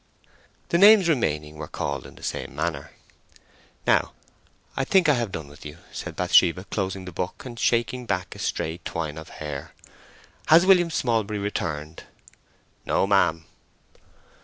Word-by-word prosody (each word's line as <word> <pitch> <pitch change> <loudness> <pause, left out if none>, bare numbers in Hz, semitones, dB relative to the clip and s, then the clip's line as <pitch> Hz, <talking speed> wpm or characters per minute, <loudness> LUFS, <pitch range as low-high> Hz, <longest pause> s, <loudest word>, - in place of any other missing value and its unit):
The 170 - +2
names 205 -2 +8
remaining 75 - 0
were 75 -1 -6
called - - -4
in - - -15
the - - -16
same - - -4
manner. 80 +2 -3 1.0
"Now - - +2 0.6
I 135 - 0
think 185 +4 +3
I 150 - +6
have 120 -6 -1
done 80 -5 -6
with 70 0 -14
you," 75 +1 -9
said - - -7
Bathsheba, 90 +2 +4
closing 95 -2 -3
the 90 - -7
book 90 +7 -5
and 120 -2 -8
shaking 120 +1 0
back 90 -3 -2
a - - -11
stray 80 +2 -2
twine 80 -2 -4
of 80 - -11
hair. 75 -3 -7 0.7
"Has 165 +3 +7
William 180 -3 +5
Smallbury 110 -8 0
returned?" 80 -6 -4 0.8
"No, - - +1
ma'am." 85 -5 +2
95 Hz, 150 wpm, -25 LUFS, 80-125 Hz, 1.0 s, names